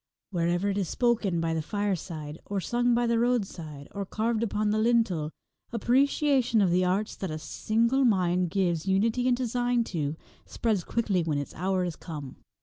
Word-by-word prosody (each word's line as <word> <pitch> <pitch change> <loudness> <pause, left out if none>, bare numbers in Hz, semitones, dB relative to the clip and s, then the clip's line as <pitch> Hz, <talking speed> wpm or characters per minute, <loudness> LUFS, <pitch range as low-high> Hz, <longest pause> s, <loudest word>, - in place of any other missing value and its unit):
Wherever 175 +2 +1
it 200 - -1
is 185 -5 -1
spoken 225 -8 +1
by 165 0 0
the 160 - 0
fireside, 165 -5 -3
or 200 -1 -1
sung 240 +5 +1
by 240 0 +2
the 235 -1 +2
roadside, 185 - -2
or 200 - -4
carved 220 +3 -1
upon 210 -2 0
the 215 - +1
lintel, 220 -9 +2 0.4
appreciation 255 +1 +2
of 190 -4 +3
the 180 +1 +3
arts 190 +4 0
that 190 - -4
a 155 - -3
single 230 - +1
mind 180 -6 +2
gives 175 -2 0
unity 225 +6 +2
and 245 -1 +3
design 245 -1 +1
to, 150 -2 -1 0.3
spreads 215 -6 -1
quickly 205 -5 0
when 160 -3 -1
its 145 - -4
hour 185 +2 0
is 175 -3 -3
come. 145 -6 -8
200 Hz, 175 wpm, -28 LUFS, 170-235 Hz, 0.4 s, of